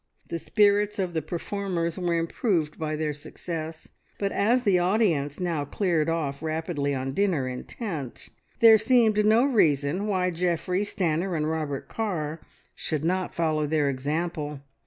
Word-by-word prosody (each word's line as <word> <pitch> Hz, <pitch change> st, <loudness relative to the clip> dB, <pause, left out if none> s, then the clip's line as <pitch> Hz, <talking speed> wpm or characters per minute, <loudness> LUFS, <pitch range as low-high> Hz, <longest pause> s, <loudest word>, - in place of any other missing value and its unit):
The 170 Hz, -, -3 dB
spirits 205 Hz, +2 st, +2 dB
of 185 Hz, -3 st, -1 dB
the 160 Hz, -, 0 dB
performers 175 Hz, +1 st, -3 dB
were 175 Hz, -2 st, 0 dB
improved 165 Hz, -2 st, -1 dB
by 155 Hz, -1 st, -2 dB
their 155 Hz, -1 st, -1 dB
success, 160 Hz, +2 st, -7 dB, 0.3 s
but 200 Hz, -1 st, -1 dB
as 240 Hz, +5 st, +2 dB
the 195 Hz, -5 st, +4 dB
audience 175 Hz, -7 st, +1 dB
now 170 Hz, -5 st, -1 dB
cleared 165 Hz, 0 st, 0 dB
off 150 Hz, -4 st, -2 dB
rapidly 155 Hz, -3 st, -1 dB
on 135 Hz, 0 st, -3 dB
dinner 175 Hz, -8 st, +1 dB
intent, 140 Hz, -, -6 dB, 0.3 s
there 225 Hz, -1 st, +8 dB
seemed 220 Hz, -2 st, +4 dB
no 220 Hz, +4 st, +5 dB
reason 170 Hz, -, +2 dB
why 185 Hz, -3 st, +1 dB
Geoffrey, 180 Hz, +2 st, 0 dB
Stanor, 180 Hz, -3 st, -1 dB
and 150 Hz, 0 st, 0 dB
Robert 155 Hz, -3 st, -3 dB
Carr 165 Hz, -8 st, -3 dB, 0.3 s
should 155 Hz, 0 st, -2 dB
not 185 Hz, +1 st, -1 dB
follow 155 Hz, -2 st, +1 dB
their 150 Hz, -2 st, +2 dB
example. 150 Hz, +1 st, -3 dB
165 Hz, 145 wpm, -26 LUFS, 150-200 Hz, 0.3 s, there